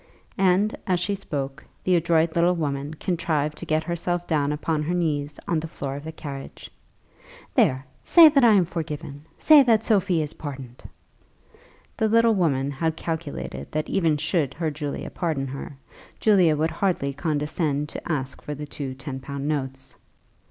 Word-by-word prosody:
And, 195 +3 +3
as 180 -2 +2
she 200 +3 0
spoke, 140 -8 -4 0.2
the 185 - +3
adroit 165 -1 +2
little 175 +1 +3
woman 145 -2 -3
contrived 155 -4 -1
to - - -8
get 155 0 +1
herself 175 +1 -2
down 150 -4 +1
upon 150 +1 -1
her 165 +4 -1
knees 145 -4 -1
on 165 - +1
the 160 - -5
floor 140 -3 -5
of 145 - -7
the 160 - -5
carriage. 140 -3 -8 0.8
"There; 130 +1 +2 0.2
say 335 -2 +8
that 285 -3 +4
I 230 -2 +7
am 190 -4 +4
forgiven; 150 -3 -6
say 305 -2 +7
that 225 -4 +3
Sophie 190 -7 +2
is 150 - -5
pardoned." 135 -5 -8 1.2
The 220 -1 +2
little 230 +1 +5
woman 145 -8 +1
had 160 +3 -1
calculated 70 - -5
that 155 0 -2
even 165 -5 +2
should 150 -3 0
her 160 -1 -1
Julie 145 -1 -4
pardon 155 -6 -2
her, 135 +1 -7 0.4
Julie 190 -7 +5
would 155 +2 +1
hardly 165 -5 0
condescend 150 0 -1
to - - -6
ask 135 -3 -3
for 150 - -5
the 150 +1 -6
two 140 -2 -6
ten 135 0 -6
pound 140 +1 -5
notes. 135 -2 -3
155 Hz, 165 wpm, -24 LUFS, 140-175 Hz, 1.2 s, say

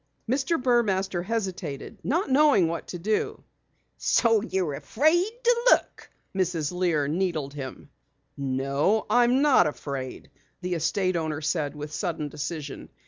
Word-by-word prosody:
Mr. 270 +7 +1
Burmaster 200 -7 +1
hesitated, 185 -9 -4
not 335 - 0
knowing 275 - +5
what 165 0 -4
to 180 - -5
do. 210 +5 -1 0.5
"So 225 -3 +3
you're 190 -8 -1
afraid 315 - +2
to 485 0 +5
look?" - - +2 0.3
Mrs. 175 -5 0
Lear 175 -5 +1
needled 160 -4 -1
him. 135 -2 -7 0.5
"No, 140 +9 0
I'm 245 +3 +4
not 270 - +5
afraid," 135 -3 -6 0.3
the 180 -1 -3
estate 185 +3 0
owner 155 -2 -2
said 150 -2 -1
with 150 0 -7
sudden 160 -6 -2
decision. 150 -1 -6
180 Hz, 130 wpm, -26 LUFS, 150-230 Hz, 0.5 s, knowing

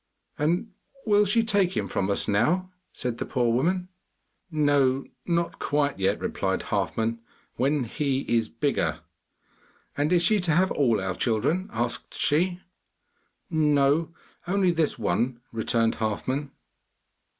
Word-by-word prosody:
'And 175 +9 0 0.3
will 210 -1 +4
she 225 +4 +3
take 200 -4 +1
him - - -1
from 95 - -1
us 100 - +1
now?' 175 - +1 0.2
said 120 -2 -4
the - - -2
poor 120 -3 +1
woman. 180 +8 +1 0.6
'No, 145 -4 +2 0.2
not 170 -1 0
quite 145 -4 0
yet,' 95 +2 +1
replied - - -2
Halfman; 115 +1 -1 0.4
'when 140 +1 +1
he 135 +3 -1
is 115 -4 0
bigger.' 85 - -1 0.9
'And 145 +3 0
is 175 -1 +4
she 215 +4 +3
to 175 -4 +1
have 185 +4 +3
all 120 -7 +2
our 95 0 -2
children?' 130 - 0
asked 120 +2 -3
she. 175 +4 +1 0.9
'No, 150 0 +2 0.4
only 190 -1 +2
this 160 -3 0
one,' 120 +4 0
returned 115 0 +1
Halfman. 130 +6 -2
145 Hz, 130 wpm, -26 LUFS, 115-175 Hz, 0.9 s, will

